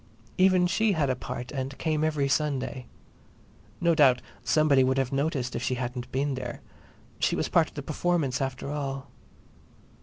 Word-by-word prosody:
Even 185 -1 +5
she 210 +4 +2
had 145 -6 +1
a - - 0
part 125 0 -6
and 135 -1 -4
came 155 -1 0
every 150 -3 +1
Sunday. 135 -2 -1 0.9
No 170 -1 +3
doubt 135 -6 +5 0.2
somebody 150 -4 +4
would 130 +1 +1
have 135 -2 0
noticed 135 -3 -1
if - - -2
she 130 - 0
hadn't 125 0 -4
been 140 +2 0
there; 125 -2 -5 0.6
she - - +2
was - - -1
part - - +4
of - - -25
the - - -5
performance 160 -8 0
after 135 +1 -3
all. 135 -2 -4
135 Hz, 170 wpm, -27 LUFS, 130-155 Hz, 0.9 s, Even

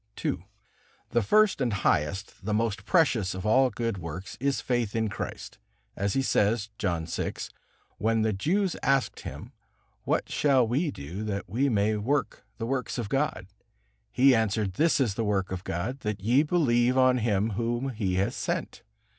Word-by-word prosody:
II. - - -2 0.6
The 120 - +3
first 210 - +3
and 125 -3 +1
highest, 95 -1 -1
the 105 +1 0
most 110 -2 -1
precious 125 - +2
of 95 - -6
all 130 +4 +4
good 115 -3 -3
works 85 +3 -7
is 140 +1 0
faith 120 -4 -1
in 110 -1 +1
Christ, 105 - -6 0.4
as 100 0 -1
He 135 - +1
says, 110 -2 +1
John 85 -4 -1
vi. 85 - -3 0.7
When 110 +1 +2
the 110 -1 +1
Jews 180 - 0
asked 135 -1 +1
Him: - - -8 0.5
"What - - 0
shall 135 -5 +3
we 145 +8 0
do 85 - -6
that 100 -2 -3
we 125 +9 +1
may 105 -1 +2
work 135 +7 -1
the 115 - -3
works 130 +1 -2
of 115 -4 -3
God?" 140 -6 -1 0.7
He 130 +2 +5
answered: 110 -4 +1
"This 160 - +2
is 120 -7 +2
the 115 - -2
work 100 -3 0
of 95 -1 -4
God, 105 +11 -3
that 105 -4 -3
ye 120 +8 +3
believe 130 -6 +2
on 130 -1 +4
Him 110 -1 +1
Whom 120 +5 -1
He 105 -7 -2
hath 95 +2 +1
sent." - - -3
115 Hz, 170 wpm, -27 LUFS, 100-130 Hz, 0.7 s, He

